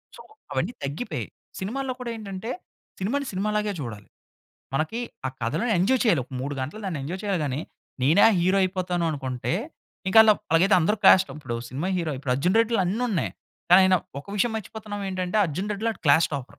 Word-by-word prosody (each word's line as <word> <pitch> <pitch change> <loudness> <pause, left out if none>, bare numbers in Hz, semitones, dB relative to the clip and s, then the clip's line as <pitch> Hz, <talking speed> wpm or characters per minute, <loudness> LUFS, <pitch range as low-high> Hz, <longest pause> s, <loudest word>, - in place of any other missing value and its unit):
So, - - -12 0.3
అవన్నీ 170 - -1
తగ్గిపోయాయి. 145 - -4 0.3
సినిమాల్లో 255 +7 -3
కూడా 235 -1 -4
ఏంటంటే, 210 +2 -6 0.5
సినిమా‌ని 275 +8 -1
సినిమా 200 +3 -1
లాగే 210 -1 -1
చూడాలి. 110 -5 -7 0.7
మనకి 160 - -1 0.3
ఆ - - 0
కథలోని 160 - 0
ఎంజాయ్ 240 +8 +3
చేయాలి 170 - +4
ఒక 130 - -20
3 140 +2 -3
గంటలు 150 +12 -5
దాన్ని 165 -6 -3
ఎంజాయ్ 175 +7 -5
చేయాలి 195 -5 0
గాని, 140 +1 -2 0.4
నేనా 160 +11 +5 0.2
హీరో 185 +3 +3
అయిపోతాను 180 -2 -1
అనుకుంటే, 130 0 -3 0.5
ఇంక 190 - 0
అలా 215 -1 +7 0.2
అలాగైతే 185 +5 +5
అందరూ 210 +7 +2
క్లాస్ 190 0 +8
ఇప్పుడు 140 -6 -5
సినిమా 145 +9 -3
హీరో 165 -2 -1 0.2
'అర్జున్ 180 +10 +1
రెడ్డి'లో 230 -2 +3
అన్ని 215 +7 -1
ఉన్నాయి. 185 - 0 0.4
కానీ, 185 +2 +9
ఆయన 185 0 +5 0.3
ఒక - - -19
విషయం 225 +3 +1
మర్చిపోతున్నాం 210 -1 -6
ఏంటంటే, 185 +1 -2
అర్జున్ 185 +7 -4
రెడ్డిలో 220 +3 -1
వాడు - - -18
క్లాస్ 160 +3 +5
టాపర్. 140 -3 -2
185 Hz, 175 wpm, -25 LUFS, 155-215 Hz, 0.7 s, కానీ